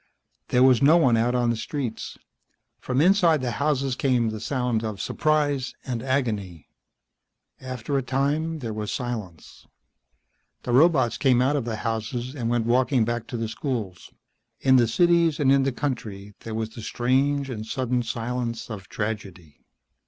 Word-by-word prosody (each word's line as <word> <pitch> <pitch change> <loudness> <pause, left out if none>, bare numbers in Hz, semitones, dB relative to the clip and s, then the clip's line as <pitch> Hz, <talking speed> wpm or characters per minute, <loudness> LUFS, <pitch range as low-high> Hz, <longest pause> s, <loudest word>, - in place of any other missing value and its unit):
There 125 0 +3
was 130 -3 +5
no 150 +5 +6
one 130 -8 +4
out 120 +2 +1
on 120 -1 +2
the - - -1
streets. 120 0 -5 0.6
From 130 +2 0
inside 175 -3 +4
the 125 -2 -2
houses 140 -3 +1
came 125 -4 +1
the 110 - -5
sound 125 -2 -1
of 110 -3 -4
surprise 145 -4 0
and 120 -3 -3
agony. 110 - -2 0.9
After 130 +1 -4
a 135 - +2
time 145 +5 -1
there 115 -3 -4
was 105 -1 -4
silence. 110 - -6 1.0
The - - -3
robots 135 -2 +4
came 130 -3 +4
out 135 +4 +2
of 135 -5 -1
the 115 -2 -3
houses 115 +3 -3
and 120 -5 -3
went 120 -1 0
walking 125 0 +2
back 120 0 -3
to 120 - -5
the 115 0 -2
schools. 110 - -5 0.5
In 130 -1 +4
the 120 -2 +4
cities 170 +4 +3
and 135 -2 +3
in 135 0 +5
the 135 0 +1
country 110 -7 -4
there 110 -1 -6
was 110 0 -3
the 115 - -9
strange 135 +5 0
and 110 -3 -5
sudden 125 +2 -1
silence 115 0 -4
of 100 -3 -8
tragedy. 95 -8 -6
125 Hz, 165 wpm, -25 LUFS, 115-135 Hz, 1.0 s, no